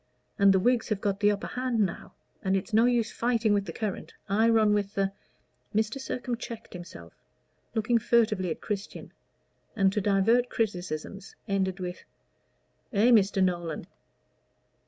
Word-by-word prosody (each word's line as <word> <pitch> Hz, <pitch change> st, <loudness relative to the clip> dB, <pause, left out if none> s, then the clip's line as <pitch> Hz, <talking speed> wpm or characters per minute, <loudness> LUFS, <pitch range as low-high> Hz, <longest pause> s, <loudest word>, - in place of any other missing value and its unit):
And 200 Hz, 0 st, +7 dB
the 190 Hz, -, +4 dB
Whigs 245 Hz, +4 st, +1 dB
have 215 Hz, -3 st, 0 dB
got 200 Hz, -1 st, -1 dB
the 205 Hz, -, +4 dB
upper 205 Hz, 0 st, -1 dB
hand 250 Hz, -2 st, -2 dB
now, 195 Hz, -5 st, -2 dB, 0.3 s
and 190 Hz, 0 st, +1 dB
it's 195 Hz, +4 st, -6 dB
no 225 Hz, +2 st, +5 dB
use 235 Hz, -2 st, +1 dB
fighting 230 Hz, -3 st, +1 dB
with 200 Hz, -1 st, +1 dB
the 170 Hz, -, -5 dB
current. 210 Hz, +1 st, -5 dB
I 220 Hz, +4 st, +3 dB
run 220 Hz, -2 st, +4 dB
with 205 Hz, -1 st, -1 dB
the 195 Hz, -1 st, +1 dB, 0.3 s
" -, -, -24 dB
Mr. 220 Hz, +5 st, 0 dB
Sircome 250 Hz, -2 st, -4 dB
checked 230 Hz, -2 st, -8 dB
himself, 85 Hz, -, -10 dB, 0.6 s
looked 225 Hz, +1 st, +2 dB
furtively 215 Hz, -6 st, +2 dB
at 160 Hz, -, -4 dB
Christian, 205 Hz, -1 st, -5 dB, 0.6 s
and, 195 Hz, -2 st, +3 dB
to 210 Hz, -, 0 dB
divert 210 Hz, +5 st, +3 dB
criticisms, 190 Hz, -2 st, -4 dB
ended 190 Hz, -1 st, -1 dB
with 180 Hz, -1 st, -5 dB, 0.9 s
"eh, 220 Hz, +4 st, +4 dB
Mr. 200 Hz, -4 st, +4 dB
Nolan?" 175 Hz, -4 st, -2 dB
205 Hz, 155 wpm, -28 LUFS, 190-230 Hz, 0.9 s, And